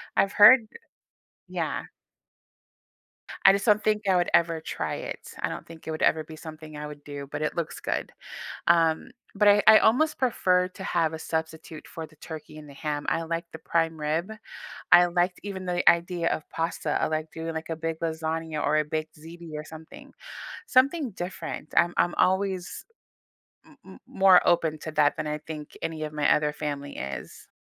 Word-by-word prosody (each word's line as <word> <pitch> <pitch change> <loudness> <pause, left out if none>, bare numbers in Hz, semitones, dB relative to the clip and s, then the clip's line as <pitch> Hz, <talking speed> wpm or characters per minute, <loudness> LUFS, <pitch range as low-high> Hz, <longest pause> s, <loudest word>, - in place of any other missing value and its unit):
I've 195 - +2
heard 220 +2 +8 0.8
Yeah. - - -3 1.6
I 195 - +9
just 200 +2 -1
don't 210 0 +4
think 215 0 +1
I 185 - +4
would 175 - +1
ever 165 -1 +3
try - - -4
it. - - -7
I - - 0
don't - - -7
think 165 -1 -13
it - - -3
would 155 - -4
ever 155 0 +3
be 155 0 -11
something 155 -1 -10
I 150 0 -6
would 145 -1 -10
do, 145 -1 -7
but 150 +1 -4
it 155 - -2
looks 170 -2 -3
good, - - -3 0.6
um, 165 -2 +3 0.2
but 205 0 +3
I 205 0 +6
I 220 - +10
almost 285 +8 +3
prefer 185 -8 +2
to 190 - -10
have 165 -3 0
a 160 - -5
substitute 160 -1 -5
for 160 -1 -7
the 155 - -22
turkey 155 -1 -9
and 150 -1 -11
the - - -12
ham, 145 0 -4
I 165 - 0
like 165 +1 -3
the 160 - -9
prime 165 -1 0
rib. 160 +7 -1 0.6
I 175 0 +9
liked 175 +1 0
even 190 -2 -6
the 175 0 +2
idea 170 0 0
of 155 - -3
pasta. 165 -2 -2
I - - +3
like 155 0 -3
doing, 165 0 -5
like, 160 +1 -5
a 165 - -2
big 165 0 -3
lasagna 160 -1 -3
or 150 - +2
a 155 - +2
baked 155 +1 -4
ziti 165 +1 -11
or 150 - -5
something. 160 0 -12 0.6
Something 275 0 +3
different. 175 -4 -6
I'm 175 +1 +4
I'm 175 - +2
always 190 -1 0 0.8
m - - -20
m - - -13
more 190 -2 +6
open 160 -3 +2
to 155 - -6
that 145 -1 +3
than 155 - -3
I 150 0 -2
think 150 -1 -9
any 160 -1 -3
of 155 0 -5
my 150 -1 +3
other 150 0 0
family 145 -2 -5
is. 70 0 -7
165 Hz, 190 wpm, -26 LUFS, 155-180 Hz, 1.6 s, I